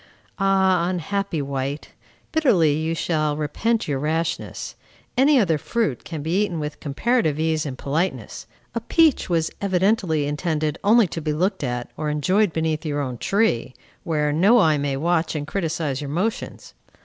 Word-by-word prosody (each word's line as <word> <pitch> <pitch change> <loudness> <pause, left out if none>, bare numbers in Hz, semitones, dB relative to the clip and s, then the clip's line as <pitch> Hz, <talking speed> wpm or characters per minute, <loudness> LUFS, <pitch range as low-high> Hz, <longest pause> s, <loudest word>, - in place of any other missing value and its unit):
Ah, 190 -2 +3
unhappy 185 -2 -2
wight! 140 +1 -4 0.4
Bitterly 200 - +3
you 160 +2 -1
shall 155 -3 0
repent 225 +10 -1
your 140 -3 -1
rashness. 160 +3 -2 0.4
Any 270 +2 +5
other 165 -8 +2
fruit 160 - -1
can 155 -4 -6
be 170 +6 +1
eaten 175 -6 -3
with 150 -1 -5
comparative 155 - 0
ease 160 -1 0
and 130 -2 -6
politeness; 160 +8 -3 0.3
a 230 - -1
peach 315 - +3
was 165 -2 +1
evidently 185 -5 +1
intended 150 0 -1
only 220 +2 +5
to 165 -1 -5
be 155 -1 -1
looked 180 +2 0
at, 125 -2 -3
or 155 -1 -2
enjoyed 185 +7 +2
beneath 160 -1 -1
your 145 -2 -2
own 130 -4 -3
tree, 195 - 0 0.3
where 150 -3 0
no 195 +10 +5
eye 155 -9 +4
may 140 -1 -1
watch 165 +2 0
and 145 -1 -2
criticize 155 -5 -2
your 145 - -5
motions. 200 - -3
160 Hz, 160 wpm, -23 LUFS, 150-195 Hz, 0.4 s, Any